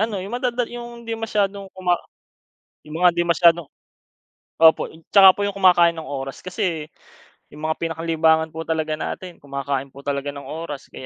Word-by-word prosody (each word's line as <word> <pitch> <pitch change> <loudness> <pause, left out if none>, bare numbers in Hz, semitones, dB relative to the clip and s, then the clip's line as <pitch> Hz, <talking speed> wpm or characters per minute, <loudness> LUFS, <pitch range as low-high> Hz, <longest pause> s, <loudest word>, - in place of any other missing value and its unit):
ano 220 -1 0
'yung 190 +4 -7
madada 245 0 0
'yung 240 0 -9
hindi 230 - -4
masyadong 205 -3 -2
kuma 180 -1 +2 0.9
'yung 150 +1 -8
mga - - +9
'di 175 0 0
masyadong 170 -2 +4 0.9
opo 160 -1 +6 0.2
tsaka 195 -2 +8
po - - -4
'yung 200 0 -2
kumakain 175 -3 +5
ng 160 - -6
oras 135 -1 -6
kasi 175 -4 -2 0.7
'yung 150 - -11
mga 160 - -1
pinakalibangan 160 -1 +1
po 160 +1 -7
talaga 160 -1 -1
natin 180 +2 -6
kumakain 140 -1 -4
po 140 - -12
talaga 140 0 -3
ng 140 - -9
oras 155 -3 -7
kaya - - -10
165 Hz, 170 wpm, -22 LUFS, 155-195 Hz, 0.9 s, mga